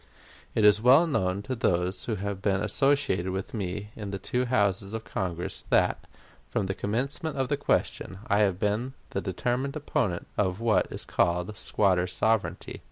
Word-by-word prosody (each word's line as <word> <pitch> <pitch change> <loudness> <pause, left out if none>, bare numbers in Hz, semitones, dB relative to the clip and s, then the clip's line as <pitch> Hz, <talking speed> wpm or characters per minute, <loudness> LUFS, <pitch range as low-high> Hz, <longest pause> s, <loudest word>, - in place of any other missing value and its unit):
It 110 - +3
is 105 0 +6
well 130 +8 +7
known 100 - 0
to 130 - -3
those 90 -5 0
who 115 - -1
have 100 0 -4
been 100 -2 +1
associated 135 -6 +2
with 95 0 -4
me 105 0 -4
in 105 -2 -6
the 100 - -3
two 125 +6 -1
Houses 100 -4 +1
of 110 0 -4
Congress 90 -5 -3
that, - - +2 0.4
from 100 - -1
the 95 - -1
commencement 135 - -2
of 130 -1 0
the 145 - +2
question, 140 -8 -1
I 105 -4 +2
have 100 -4 +3
been 105 +6 -1 0.2
the 100 - -2
determined 125 - -2
opponent 140 - -1
of 95 -1 +1
what 110 -6 +2
is - - -5
called 90 +4 0
squatter 95 -3 +1
sovereignty. 95 -1 -1
105 Hz, 170 wpm, -28 LUFS, 95-125 Hz, 0.4 s, well